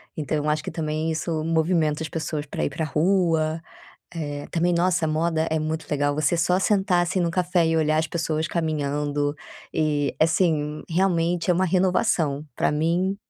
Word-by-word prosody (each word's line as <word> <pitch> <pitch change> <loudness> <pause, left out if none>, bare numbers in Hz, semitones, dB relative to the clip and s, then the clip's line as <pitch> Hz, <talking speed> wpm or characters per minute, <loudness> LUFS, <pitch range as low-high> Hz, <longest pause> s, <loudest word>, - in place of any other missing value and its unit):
então, 155 0 -2
eu 150 0 -2
acho 150 0 0
que - - -5
também 155 0 -2
isso 160 0 -2
movimenta 160 -1 +1
as - - -3
pessoas 155 -2 -4
para 145 - -4
ir - - 0
pra 155 +3 -3
rua, 160 -1 +1 0.5
eh, 145 -4 -5
também 175 +1 +1
nossa, 175 -1 +2
moda 160 +1 0
é 160 - +1
muito 155 +1 -3
legal, 145 0 +1
você 155 +2 +1
só 180 +2 +2
sentar 190 -3 +2
assim 175 +2 -1
num 170 -2 +1
café 175 -1 +1
e 165 - +1
olhar 155 0 +2
as 160 +1 +1
pessoas 160 -2 -1
caminhando. 145 -3 -1 0.4
E, 150 -2 0
é - - +7
assim, 155 -3 0
realmente 170 -1 +1
é - - +4
uma 185 +2 +2
renovação 180 -5 +1
pra - - +2
mim 170 +6 0
160 Hz, 180 wpm, -24 LUFS, 155-175 Hz, 0.5 s, é